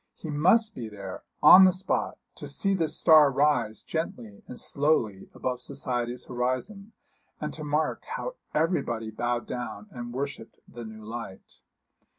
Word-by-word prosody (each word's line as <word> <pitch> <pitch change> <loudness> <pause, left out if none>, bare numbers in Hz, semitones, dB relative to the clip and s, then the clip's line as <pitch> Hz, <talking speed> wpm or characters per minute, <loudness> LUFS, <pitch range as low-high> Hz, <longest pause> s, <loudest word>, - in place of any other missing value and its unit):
He 160 - -7
must 200 +9 +3
be 115 -3 -6
there, 100 -3 -8 0.2
on 180 +5 +11
the 185 - +7
spot, 185 +2 -2 0.2
to - - -9
see 195 -1 0
this 165 -5 -1
star 155 -3 +7
rise 135 -6 +1
gently 120 -10 -5
and 125 - -8
slowly 130 -10 0
above 125 -1 -3
society's 125 -3 -4
horizon, 130 - -3 0.5
and - - -4
to 155 - -7
mark 150 +1 0
how - - -4 0.2
everybody 120 -9 0
bowed 120 +2 -2
down 125 +12 -6
and 120 -1 -7
worshipped 135 -2 -5
the 120 -1 -9
new 110 0 -10
light. 115 -4 -8
130 Hz, 150 wpm, -27 LUFS, 120-160 Hz, 0.5 s, on